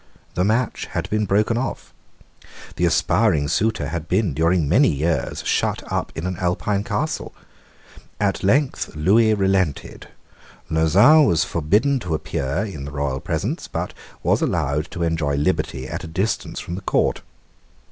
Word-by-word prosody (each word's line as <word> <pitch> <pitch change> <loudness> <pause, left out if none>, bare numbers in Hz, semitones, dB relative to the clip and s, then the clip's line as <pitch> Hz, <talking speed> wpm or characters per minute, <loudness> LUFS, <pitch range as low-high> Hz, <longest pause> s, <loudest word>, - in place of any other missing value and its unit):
The 90 - 0
match 115 +5 0
had - - -2
been 105 -1 0
broken 105 +4 +2
off. 130 - -5 0.8
The 90 - +1
aspiring 85 -1 +2
suitor 100 -4 0
had 80 -1 -4
been, 95 -4 +1
during 80 +1 +2
many 115 - +4
years, 80 +3 -1
shut - - 0
up - - -1
in 80 - -4
an 95 -1 -3
Alpine 95 +3 -1
castle. 155 +8 -3 0.8
At 100 -2 0
length 130 - +1
Lewis 105 +8 +3
relented. 95 -6 -1 0.6
Lauzun 100 - +5
was 80 -2 +3
forbidden 105 - +1
to 90 -8 -2
appear 75 +3 -2
in 80 -10 -7
the 70 - -7
royal 70 -2 -2
presence, - - -3
but - - -4 0.3
was - - +2
allowed 75 +4 0
to 85 - -4
enjoy 80 -4 0
liberty 65 -2 -1
at - - -5
a - - -6
distance 95 +7 -2
from 85 - -6
the 95 - -4
court. - - 0
90 Hz, 150 wpm, -22 LUFS, 75-105 Hz, 0.8 s, Lauzun